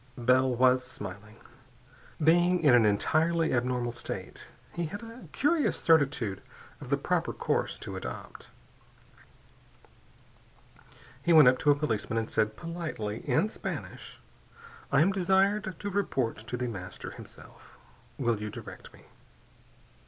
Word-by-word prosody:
Bell 130 +2 +3
was 125 +1 +3
smiling. 100 +1 -8 0.8
Being 175 +3 +3
in 140 -5 +6
an 115 -3 +6
entirely 160 +10 +1
abnormal 125 -1 0
state, 120 - -7 0.3
he 170 -1 -2
had 205 +8 -7
a 230 +2 -11
curious 300 +2 +1
certitude 135 - +2 0.4
of - - -9
the - - +2
proper - - -1
course - - -1
to - - -7
adopt. 60 - -8 2.7
He 170 - +2
went 155 -5 +8
up 125 - +1
to 150 - +1
a 145 - +6
policeman 115 -6 -2
and 115 0 -2
said 110 0 0
politely, 160 -11 -4
in 160 +12 +2
Spanish: - - -7 0.7
"I - - +4
am 185 +5 +4
desired 195 +1 +1
to 205 - -4
report 135 - -1
to 125 - -3
The 125 - -2
Master, 95 -5 -7
himself. - - -14 0.4
Will 120 -5 0
you 105 - -4
direct - - -10
me?" - - -17
130 Hz, 130 wpm, -29 LUFS, 115-170 Hz, 2.7 s, went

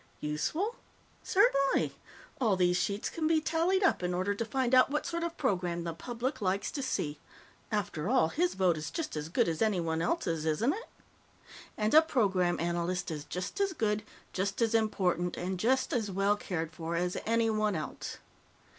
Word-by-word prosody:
Useful? 310 - -2 0.4
Certainly. 370 - +3 0.5
All 225 -7 +3
these 180 -1 +3
sheets 200 +3 -1
can 315 -2 -1
be 320 0 +4
tallied 335 +5 +1
up 385 - +3
in 180 0 -1
order 185 +3 0
to 205 - -2
find 255 +2 -1
out 255 0 +7
what 295 +1 -1
sort 340 0 -2
of 340 0 -3
program 180 - 0
the 170 -1 -3
public 240 - -4
likes 195 0 0
to 280 - -3
see. 150 - -2 0.5
After 190 -5 -1
all, 250 -10 +4
his 350 - 0
vote 185 -4 +2
is 155 0 -4
just 325 - -4
as 150 +1 -4
good 170 - +2
as 165 -2 -2
anyone 170 -7 +1
else's, 170 - 0
isn't 160 - +1
it? 455 +5 -8 0.9
And 215 0 0
a 315 - +10
Program 195 - +1
Analyst 175 +1 -1
is 150 -2 -5
just 180 - -5
as 390 -2 +1
good, 215 -7 0 0.3
just 195 +1 -1
as 230 -1 +2
important, 185 -5 +1
and 185 +1 -3
just 260 +6 +2
as 225 -4 0
well 195 +2 +2
cared 165 -5 -4
for 165 +1 -4
as 180 +1 0
anyone 220 -2 +2
else. 155 - -5
200 Hz, 180 wpm, -31 LUFS, 175-260 Hz, 0.9 s, a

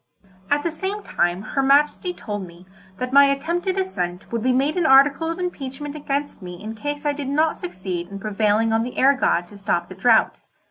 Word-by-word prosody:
At 290 0 +2
the 335 - -1
same 390 +6 -4
time 175 +3 -1
her 275 - -1
Majesty 290 +6 +3
told 205 - -6
me 170 +1 -15 0.3
that 255 0 -4
my 280 0 +8
attempted 340 +7 -1
ascent 180 - -3
would 230 -1 -2
be 255 +3 +2
made 275 +4 +1
an 350 -3 +1
article 280 +4 +5
of 330 - -3
impeachment 290 -5 -5
against 285 -4 -3
me 180 -1 -8
in 220 +1 -6
case 290 +5 -5
I 290 - +2
did 285 -1 -5
not 310 +3 +1
succeed 175 -1 -5
in 200 - -8
prevailing 215 +2 +1
on 225 - +2
the 245 +2 -5
air 275 +2 +5
god 175 -10 +1
to 205 - -13
stop 195 -3 -1
the - - -8
drought. 220 +4 +3
270 Hz, 205 wpm, -22 LUFS, 205-295 Hz, 0.3 s, my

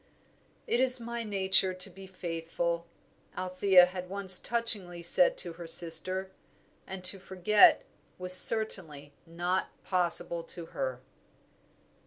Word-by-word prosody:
"It 240 - -1
is 255 0 +3
my 235 0 -6
nature 190 -2 +2
to 185 - +1
be 195 0 -13
faithful," 170 -1 -5 0.5
Althea 185 0 +3
had 180 0 -9
once 190 -1 +6
touchingly 205 -7 -1
said - - +2
to 170 - -6
her 170 0 -11
sister; 180 +3 0 0.6
and 190 -1 -9
to 190 +2 0
forget 190 +3 +3 0.3
was 180 0 -1
certainly 165 -10 0
not 175 +3 -3 0.2
possible 175 -2 -1
to 170 0 -9
her! 130 -1 -5
185 Hz, 120 wpm, -28 LUFS, 170-195 Hz, 0.6 s, once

